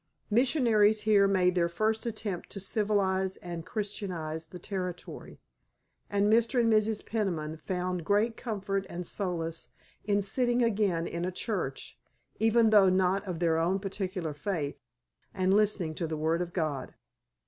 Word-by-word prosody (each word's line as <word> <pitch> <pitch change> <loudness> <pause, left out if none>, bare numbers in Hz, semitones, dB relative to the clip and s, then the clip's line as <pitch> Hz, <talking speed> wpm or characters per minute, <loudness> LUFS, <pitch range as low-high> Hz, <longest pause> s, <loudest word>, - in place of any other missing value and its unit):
Missionaries 225 -4 +4
here 210 -2 +4
made 185 -2 +3
their 170 -1 +2
first 215 +6 0
attempt 215 -5 -4
to 200 - -7
civilize 190 -2 0
and 170 -1 -7
Christianize 180 -7 -4
the 180 - -9
Territory, 180 -1 -6 0.7
and 200 0 +2
Mr. 230 +4 +3
and 230 -1 +4
Mrs. 215 0 +1
Peniman 170 -8 -2
found 180 0 -3
great 210 +5 +2
comfort 195 -4 -3
and 175 +1 -5
solace 165 -4 -3 0.3
in 205 -1 +1
sitting 240 +4 +1
again 200 -7 +1
in 170 0 -4
a 185 - -1
church, 180 - -4 0.4
even 225 0 +4
though 200 -3 +7
not 185 +1 +2
of 180 -3 -3
their 165 -1 +2
own 175 +4 +2
particular 190 -4 -4
faith, 150 -3 -3 0.6
and 185 0 +2
listening 200 -6 +2
to 165 +1 -3
the 160 0 -3
word 160 +3 +1
of 175 -1 -3
God. 155 -7 -3
190 Hz, 150 wpm, -29 LUFS, 170-215 Hz, 0.7 s, though